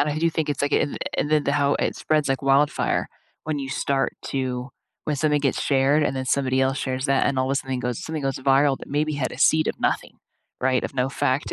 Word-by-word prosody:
and 150 +1 +2
I 150 - -2
do 165 +1 +2
think 160 -2 -2
it's 145 - -2
like 145 - 0
it - - +4
an - - -7 0.2
and 145 - -1
then 150 -1 +3
the 140 - +1
how 145 -1 +2
it - - -1
spreads 155 -2 0
like 135 0 -1
wildfire 135 +2 +2 0.4
when 155 -1 -2
you 135 - -5
start 135 0 -1
to 130 -1 -3 0.3
when 150 - -1
something 150 0 +2
gets 135 -2 0
shared, 140 +2 +3
and 135 - 0
then 130 - -2
somebody 130 -1 +1
else 135 +1 +1
shares 130 0 -3
that, 135 -1 +2
and 135 - 0
all 130 - +1
the 135 - +1
sudden 130 -2 -2
goes 125 -2 -3
something 160 -2 -4
goes 135 -1 -1
viral 135 +1 +3
that - - -11
maybe 150 +2 0
had 140 -3 -2
a - - -9
seed 155 0 +4
of - - -3
nothing, - - -1 0.5
right, 130 0 +2
of - - -5
no 130 0 +1
fact 135 +1 -1
140 Hz, 255 wpm, -24 LUFS, 130-150 Hz, 0.5 s, it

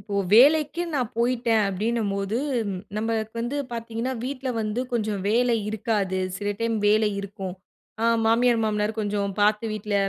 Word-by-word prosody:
இப்போ 205 -2 -7 0.2
வேலைக்கு 300 +7 +5
நான் 250 -5 0
போயிட்டேன் 235 -2 +2
அப்பிடினம்போது 200 0 -1 0.3
ம் 185 - -4 0.2
நமக்கு 220 0 -2
வந்து 240 +5 -2 0.2
பார்த்தீங்கன்னா 230 +2 -3
வீட்ல 265 0 -4
வந்து 215 +2 -2
கொஞ்சம் 215 -4 -1
வேலை 240 +2 +3
இருக்காது. 210 -3 -1 0.2
சில 205 +1 -3
டைம் 230 -1 0
வேலை 215 +1 +4
இருக்கும். 195 -2 -6 0.5
அ - - +2 0.2
மாமியார், 230 +1 +3
மாமனார் 210 +1 -1
கொஞ்சம் 205 -1 -1
பார்த்து 210 +2 +3
வீட்ல 210 -1 -3
220 Hz, 145 wpm, -25 LUFS, 210-235 Hz, 0.5 s, வேலைக்கு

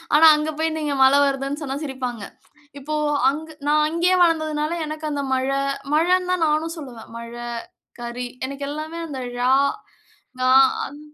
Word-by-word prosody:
ஆனா 320 - +7
அங்க 305 +1 -2
போய் 320 0 0
நீங்க 295 -2 -1
மல 275 +2 +6
வருதுனு 275 +2 -2
சொன்னா 270 -1 -3
சிரிப்பாங்க. 255 -6 -4 0.6
இப்போ 300 +3 -4 0.3
அங்க் 315 +3 -5 0.2
நா 295 - +3
அங்கேயே 340 +4 +2
வளர்ந்ததனால 315 -2 +1
எனக்கு 310 +1 -6
அந்த 285 -1 -2
மழை 265 +1 0 0.4
மழைனு 360 +3 +2
தான் 360 -3 +2
நானும் 315 +2 0
சொல்லுவேன். 245 -7 -10
மழை, 235 +1 -7 0.5
கரி 240 +1 -4 0.2
எனக்கு 275 +1 -5
எல்லாமே 310 +3 -5
அந்த 280 -4 -6 0.2
ழ, - - -5 1.0
ங, - - -4 0.4
அங் 290 - -10
295 Hz, 150 wpm, -22 LUFS, 265-315 Hz, 1.0 s, ஆனா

